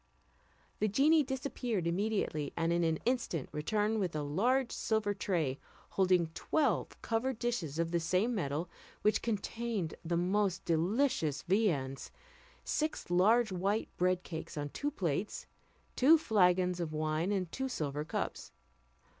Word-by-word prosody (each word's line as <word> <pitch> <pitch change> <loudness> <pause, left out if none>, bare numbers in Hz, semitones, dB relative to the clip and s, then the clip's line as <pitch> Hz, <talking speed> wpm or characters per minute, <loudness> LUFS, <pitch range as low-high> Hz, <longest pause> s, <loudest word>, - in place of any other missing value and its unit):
The 215 - +2
genie 290 +9 +4
disappeared 255 - -2
immediately, 175 -5 -1
and 165 0 +1
in 170 0 +2
an 160 -1 +2
instant 235 - -1
returned 210 +8 0
with 180 -5 -1
a 150 - -1
large 240 - +1
silver 220 -2 0
tray, 165 -9 -1 0.3
holding 180 -4 +2
twelve 300 - 0
covered 235 +2 -1
dishes 225 - -2
of 165 0 0
the 170 - +2
same 185 +8 +1
metal, 160 -4 -2 0.4
which 210 - +3
contained 225 -4 -2
the 170 0 0
most 190 +1 0
delicious 165 - +1
viands; 165 -9 0 0.5
six 310 - -2
large 215 +5 +4
white 195 +4 0
bread 180 0 +1
cakes 160 -2 -7
on 145 0 -3
two 285 - -2
plates, 190 - -2 0.5
two 300 +6 +7
flagons 180 - +3
of 165 -3 -3
wine, 155 +4 0
and 185 -4 -1
two 265 0 -3
silver 150 - -2
cups. 150 - -4
185 Hz, 140 wpm, -33 LUFS, 165-225 Hz, 0.5 s, two